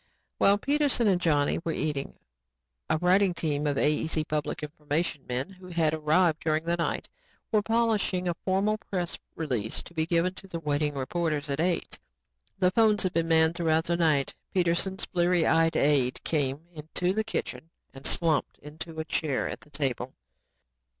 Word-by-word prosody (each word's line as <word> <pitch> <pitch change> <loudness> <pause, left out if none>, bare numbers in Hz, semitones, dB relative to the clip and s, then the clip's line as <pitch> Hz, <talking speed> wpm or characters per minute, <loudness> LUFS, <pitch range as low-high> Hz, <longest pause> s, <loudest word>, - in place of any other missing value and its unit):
While 200 +1 +5
Peterson 280 -1 +1
and 185 -3 +2
Johnny 145 -4 +2
were 165 - -1
eating, 145 -3 -3 0.7
a - - +2
writing 180 +2 +3
team 150 -3 -1
of 145 -1 0
AEC 155 +1 +1
public 150 0 -2
information 150 -1 -3
men 130 +8 -3
who 185 -1 -13
had 165 -3 +1
arrived 160 +1 +2
during 155 0 0
the 170 +1 +1
night, 170 -1 -2 0.4
were 215 - +3
polishing 220 -5 +1
a 175 - +1
formal 195 +5 0
press 180 -5 -4 0.2
release 125 -9 -2
to - - -13
be 160 -1 -1
given 170 +1 +1
to 195 +1 -11
the 170 -3 -5
waiting 150 -1 -1
reporters 150 +1 -2
at 140 - -2
eight. 175 +1 -1 0.6
The 185 -1 +3
phones 215 -1 +3
had 185 -1 -1
been 165 -2 +1
manned 160 0 +4
throughout 160 -2 +1
the 170 +1 0
night. 155 -5 +2 0.2
Peterson's 185 +2 +1
bleary 175 -1 +2
eyed 165 0 +3
aide 140 -3 +2
came 145 -2 0
into 165 +4 -2
the 220 +2 0
kitchen 190 -6 -4 0.2
and 135 0 -2
slumped 160 -4 +1
into 160 +2 -9
a - - -6
chair 150 -4 -1
at - - -6
the - - -14
table. 130 -3 -3
165 Hz, 170 wpm, -28 LUFS, 150-180 Hz, 0.7 s, While